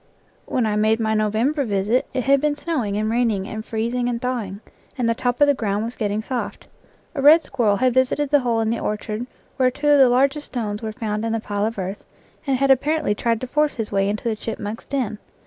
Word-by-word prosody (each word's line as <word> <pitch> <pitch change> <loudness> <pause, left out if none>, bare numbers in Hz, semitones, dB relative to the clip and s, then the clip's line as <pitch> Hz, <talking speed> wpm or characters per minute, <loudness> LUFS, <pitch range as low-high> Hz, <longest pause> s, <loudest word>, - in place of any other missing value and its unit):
When 250 - 0
I 210 -1 0
made 215 +1 +2
my 220 -1 0
November 220 +8 +1
visit 210 +2 0
it 255 -1 -2
had 275 +1 +3
been 300 -1 +1
snowing 275 -10 -2
and 215 +1 0
raining 220 -4 0
and 215 0 -5
freezing 235 +3 -1
and 235 -1 -2
thawing, 235 -6 -3 0.4
and 245 -2 0
the 230 - +3
top 245 +1 -1
of 290 - +7
the 285 - +4
ground 210 -4 -1
was 235 - -5
getting 210 0 -2
soft. 250 0 -4 0.5
A 285 - -3
red 310 +4 +7
squir 245 -6 -1
rel 205 - +4
had 255 +3 +2
visited 260 +3 +1
the 290 - +6
hole 235 -3 0
in 220 0 0
the 230 - -1
orchard 215 +2 -3 0.3
where 255 -1 +4
two 290 +3 -1
of 290 -1 +6
the 265 -2 +7
largest 275 +4 +2
stones 210 -4 -3
were 220 -1 -4
found 215 -1 -3
in 225 0 -1
the 225 - 0
pile 205 -1 -2
of 225 - -5
earth, 190 +2 -4 0.4
and 270 -1 +2
had 275 +1 +3
apparently 295 -1 +2
tried 230 +1 0
to - - -2
force 300 +3 +1
his 225 -3 -4
way 195 0 +1
into 210 +1 -3
the 230 -2 0
chipmunk's 215 0 -5
den. 240 -7 -2
230 Hz, 235 wpm, -22 LUFS, 215-260 Hz, 0.5 s, of